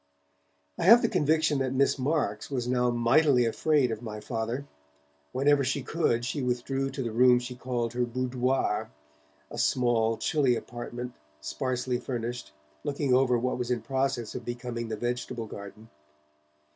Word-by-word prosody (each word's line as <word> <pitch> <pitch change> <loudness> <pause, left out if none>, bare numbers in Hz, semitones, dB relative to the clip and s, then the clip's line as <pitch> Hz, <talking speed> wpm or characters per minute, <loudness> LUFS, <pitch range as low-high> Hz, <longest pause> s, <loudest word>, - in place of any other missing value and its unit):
I - - 0
have 230 +5 +8
the - - +4
conviction 155 -1 +2
that 130 0 -1
Miss 140 +1 +2
Marks 130 -7 -1
was 125 -4 -2
now 125 0 +2
mightily 120 +2 +4
afraid 135 +2 +2
of 110 0 -4
my 110 -3 -6
Father. 115 +4 -3 0.7
Whenever 140 +1 +3
she 135 +1 -1
could, 120 -7 0
she 135 +3 -2
withdrew 130 +2 -1
to 135 0 -4
the 115 - -3
room 125 +2 +5
she 125 +1 -4
called 120 -2 -2
her 125 0 0
'boudoir', 125 -2 -1 0.6
a - - -7
small, 115 -3 +2
chilly 135 -5 +2
apartment, 120 +1 -6 0.3
sparsely 125 - -2
furnished, 120 - -4 0.3
looking 140 -2 0
over 125 -1 +4
what 125 +1 -1
was 125 -1 -2
in 120 -3 -1
process 130 -2 -1
of 125 - -6
becoming 120 0 -4
the 110 -1 -4
vegetable 120 0 -3
garden. 105 +1 -10
125 Hz, 155 wpm, -28 LUFS, 120-135 Hz, 0.7 s, have